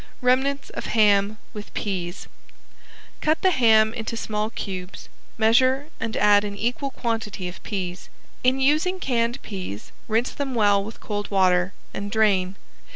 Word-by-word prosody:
~REMNANTS 265 +3 +1
OF - - -5
HAM 210 -1 +3 0.2
WITH 210 -1 -8
PEAS~ 185 -3 -3 0.9
Cut 310 +1 +2
the 375 - +5
ham 220 -6 +4
into 230 0 -4
small 215 -1 -2
cubes, 190 -4 -6 0.3
measure 255 +6 +3
and 225 -1 -3
add 205 0 +5
an 200 -1 -5
equal 245 +6 -1
quantity 225 -7 -3
of 180 - -9
peas. 180 -3 -5 0.3
In 255 +1 +3
using 310 +7 +2
canned 240 -3 0
peas 185 - -7 0.2
rinse 225 +3 +1
them 275 -3 -4
well 205 -3 +4
with 220 +3 -9
cold 205 -1 -4
water 185 -1 +3 0.2
and 200 +1 -4
drain. 195 -3 +2
220 Hz, 145 wpm, -24 LUFS, 200-250 Hz, 0.9 s, the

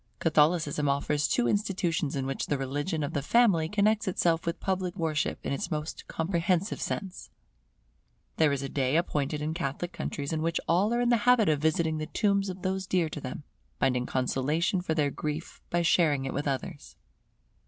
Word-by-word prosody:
Catholicism 150 -2 +2
offers 145 +2 +1
two 245 - +1
institutions 180 -7 0
in 135 -1 -2
which 135 0 -3
the 145 - 0
religion 145 +5 -2
of 145 - -3
the 145 - 0
family 175 - +3
connects 210 +1 +2
itself 170 -3 +1
with 170 - -2
public 185 -1 -2
worship 155 -4 -1
in - - -1
its 140 - -3
most 155 -2 -4
comprehensive 170 +3 0
sense. 190 -3 -4 1.1
There 155 -2 +4
is 140 -1 -1
a - - -2
day 135 0 0
appointed 150 -3 -1
in 155 +1 -1
Catholic 170 +2 -3
countries 140 +1 -4
in 155 - -1
which 165 +1 0
all 185 +6 +3
are 240 - +1
in 240 - +2
the 240 - +5
habit 235 -7 +5
of 150 -2 +1
visiting 160 0 +1
the 155 - -4
tombs 200 -2 +1
of 185 +1 -7
those 190 0 -2
dear 175 -4 +1
to 150 - -6
them; 130 +3 -6 0.4
finding 125 -1 +1
consolation 150 +8 0
for 160 -3 -1
their 145 -3 +1
grief 150 +3 -5
by 175 0 +1
sharing 155 -5 +3
it 135 - -3
with 145 +1 -2
others. 140 +1 -4
160 Hz, 185 wpm, -28 LUFS, 145-185 Hz, 1.1 s, the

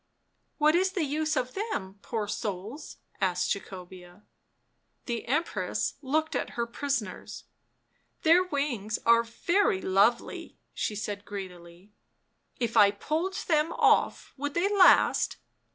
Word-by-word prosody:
"What 305 0 +4
is 375 +2 +2
the 360 - 0
use 305 +2 -1
of 255 0 -2
them, 205 - -4
poor 215 -2 -3
souls?"' 210 - -5 0.2
asked 180 -2 +1
Jacobea. 180 -1 -11 0.8
The 235 -2 -4
Empress 310 +7 -1
looked 310 +3 -1
at - - -3
her 235 - 0
prisoners. 255 -1 -4 0.4
" - - -44
Their 340 +2 +6
wings 275 - -2
are 230 0 +6
very 235 - +1
lovely," 200 +6 +1 0.2
she 210 - -2
said 205 -1 -4
greedily. 185 -2 -9 0.3
" - - -48 0.3
If 235 -2 -2
I 205 -3 +7
pulled 315 - -2
them 315 0 +2
off - - +2
would 290 +1 -4
they 395 +4 +1
last 380 -2 +5
235 Hz, 130 wpm, -28 LUFS, 200-310 Hz, 0.8 s, I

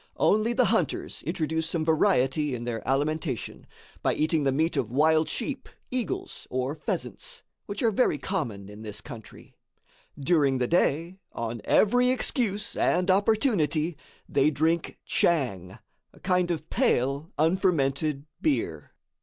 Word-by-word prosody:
Only 215 +3 +3
the 250 +1 +3
hunters - - -1
introduce 160 0 -1
some 165 -2 -1
variety 150 -4 +2
in 120 - -6
their 120 -2 -3
alimentation, 145 - -2 0.3
by - - +1
eating 155 0 +1
the 135 - +3
meat 160 +5 +1
of - - -1
wild 155 +4 +3
sheep, 270 +3 -3 0.2
eagles 250 -6 -4
or 130 +2 -1
pheasants, 150 - -4 0.2
which 200 +2 -4
are 230 - +4
very 210 -7 +2
common 120 - -3
in 105 +1 -11
this 105 -2 -6
country. 120 -6 -11 0.7
During 140 -2 +2
the 125 - +1
day, 170 +4 +1
on 115 -1 -4
every 245 +4 +4
excuse 230 -5 0
and 180 +1 +2
opportunity, 190 - +2 0.3
they 140 +2 +3
drink 160 +2 0
"tchang," 105 - 0 0.3
a - - -19
kind 180 -1 +1
of 160 -2 -3
pale, 140 - +1
unfermented 155 -4 +1 0.2
beer. 310 -3 -1
160 Hz, 135 wpm, -27 LUFS, 135-190 Hz, 0.7 s, are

